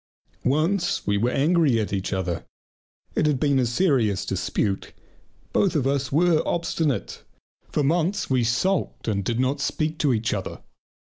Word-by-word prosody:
Once 165 +7 +1
we 100 - +1
were 115 +4 +1
angry 145 -3 +3
at 105 -2 -2
each 95 -1 -2
other. 95 -3 -2 0.7
It 150 - +1
had 145 -4 +1
been 140 -2 +2
a 125 - +2
serious 120 - +1
dispute. 100 -2 -2 0.6
Both 190 -3 +2
of 140 -4 +1
us 135 -1 0
were 160 +2 +3
obstinate, 150 - -1 0.5
for 150 - +1
months 175 +7 +1
we 130 -2 +2
sulked 145 +12 0
and 100 -3 0
did 115 +4 -1
not 130 +3 +1
speak 155 +3 -1
to 145 -4 +2
each 115 +1 0
other. - - -5
135 Hz, 155 wpm, -24 LUFS, 115-160 Hz, 0.7 s, angry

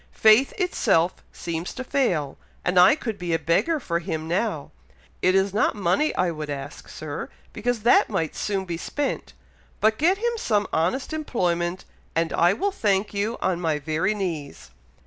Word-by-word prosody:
Faith 220 +5 +6
itself 200 - +2 0.2
seems 170 0 -5
to 260 - -4
fail, 180 - 0 0.3
and 180 0 +3
I 185 +9 +7
could 225 -9 -5
be 175 -2 -1
a - - +3
beggar 305 - +1
for 170 -9 -1
him 160 -3 -4
now! 175 -3 -1 0.5
It 185 +1 +3
is 195 0 +2
not 215 - +2
money 205 - +1
I 180 -1 +1
would 155 -2 -6
ask, 140 0 -7
Sir, 155 -1 -6 0.2
because 235 +1 -1
that 240 - +5
might 165 -7 -2
soon 195 -2 -2
be 170 -2 -4
spent; 290 - -3 0.5
but 220 0 +2
get 355 +6 +3
him 475 +3 0
some 210 - +1
honest 185 - 0
employment, 180 - -1 0.3
and 165 0 0
I 175 +1 +4
will 395 - 0
thank 205 - 0
you 205 +3 -1
on 180 -2 0
my 160 -3 +1
very 160 +8 -1
knees." 165 -8 -5
190 Hz, 170 wpm, -24 LUFS, 165-230 Hz, 0.5 s, I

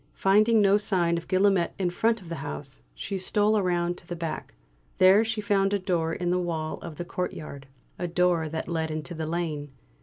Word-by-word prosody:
Finding 215 +3 +4
no 200 0 +5
sign 180 -5 +1
of 170 - -5
Guillaumet 190 -2 +2
in 185 -3 0
front 225 +4 +1
of 180 - -13
the 170 - -4
house, 75 - -6
she 195 - -4
stole 210 +3 +2
round 175 -1 0
to 170 - -20
the 175 - -4
back. 165 -2 -5 0.4
There 190 +3 +6
she 225 -1 -2
found 200 -1 +2
a - - +2
door 175 -4 -1
in 175 +1 -1
the 180 - +2
wall 160 -3 -3
of 165 -3 -8
the 175 - -5
courtyard 150 -6 -5 0.3
a 175 - -1
door 175 -2 +1
that 160 +1 -4
led 160 -2 -1
into 155 +2 -4
the 160 -1 -4
lane. 160 -3 -3
175 Hz, 205 wpm, -27 LUFS, 165-195 Hz, 0.4 s, There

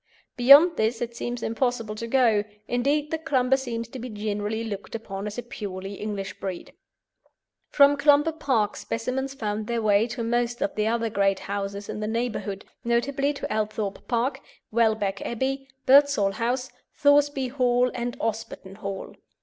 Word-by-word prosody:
Beyond 285 +7 +8
this 225 +2 +1
it 235 -1 -4
seems 240 0 -4
impossible 230 -2 -1
to 230 +2 -5
go: 230 -4 +3 0.2
indeed, 285 +5 0
the 320 - -1
Clumber 265 -5 +2
seems 235 -4 -4
to 260 - -8
be 250 +1 -6
generally 210 +1 -3
looked 205 -1 -6
upon 205 -2 -5
as 210 - -6
a 245 - -3
purely 195 -4 -6
English 200 -1 -5
breed. 185 -3 -6 1.0
From 285 0 +6
Clumber 295 +2 +4
Park 255 -9 0
specimens 265 +4 -3
found 215 -3 -3
their 235 -1 -1
way 210 +1 +4
to 240 0 -4
most 240 +1 0
of 295 0 -1
the 215 -3 0
other 230 0 0
great 195 -1 +1
houses 200 0 -4
in - - -5
the 215 - -2
neighbourhood, 220 -3 -3 0.2
notably 275 +4 +1
to 285 - -4
Althorp 215 -2 -3
Park, 240 +3 0 0.3
Welbeck 220 -3 +1
Abbey, 270 +3 -2 0.2
Birdsall 275 -7 +5
House, 245 +5 -2 0.2
Thoresby 285 -2 +3
Hall, 250 -1 +2
and 245 +1 -4
Osberton 215 -3 -4
Hall. 195 -2 -6
235 Hz, 160 wpm, -25 LUFS, 210-265 Hz, 1.0 s, Beyond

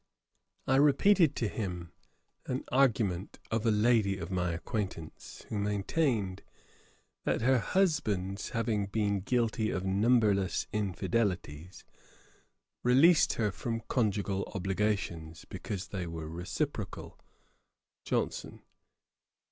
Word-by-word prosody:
I 130 - +3
repeated 150 +4 +5
to 115 - 0
him 90 -6 -4 0.6
an 130 +1 -2
argument 110 -8 +1
of 115 +1 0
a - - +5
lady 105 -2 +3
of 85 0 -6
my 90 -2 0
acquaintance, 90 -2 -5
who 105 - -2
maintained, 105 - 0 0.8
that - - 0
her 130 +2 +4
husband's 105 - 0
having 110 -3 -1
been 100 -1 0
guilty 110 +1 0
of 95 0 -2
numberless 100 -1 +2
infidelities, 95 -5 -2 1.0
released 150 +7 +5
her 105 -3 0
from 115 +3 -3
conjugal 100 -5 -1
obligations, 95 -4 -2
because 100 -2 -6
they 90 -4 -4
were 80 -1 -6
reciprocal. 85 +1 -4 0.8
JOHNSON. - - -2
105 Hz, 100 wpm, -31 LUFS, 95-115 Hz, 1.0 s, repeated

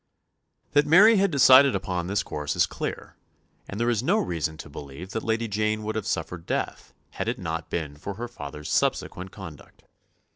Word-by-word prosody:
That 145 +1 +3
Mary 205 +8 +7
had 195 +1 +3
decided 135 -3 +7
upon 90 -2 -2
this 100 +1 0
course 75 -1 -4
is - - +4
clear, - - -6 0.5
and 100 - -6
there 120 - +1
is 115 -3 0
no 180 - +2
reason 80 - -2
to - - -9
believe 70 +5 -9
that 110 - -2
Lady 115 +1 -1
Jane 110 +1 -1
would 110 +1 -3
have 110 -1 -3
suffered 85 -2 -3
death - - -3 0.2
had - - -4
it - - -1
not 80 0 -4
been 75 -4 -3
for 95 +7 -7
her 120 +4 -5
father's 75 -9 -8
subsequent 90 +2 0
conduct. - - -12
100 Hz, 185 wpm, -26 LUFS, 80-120 Hz, 0.5 s, Mary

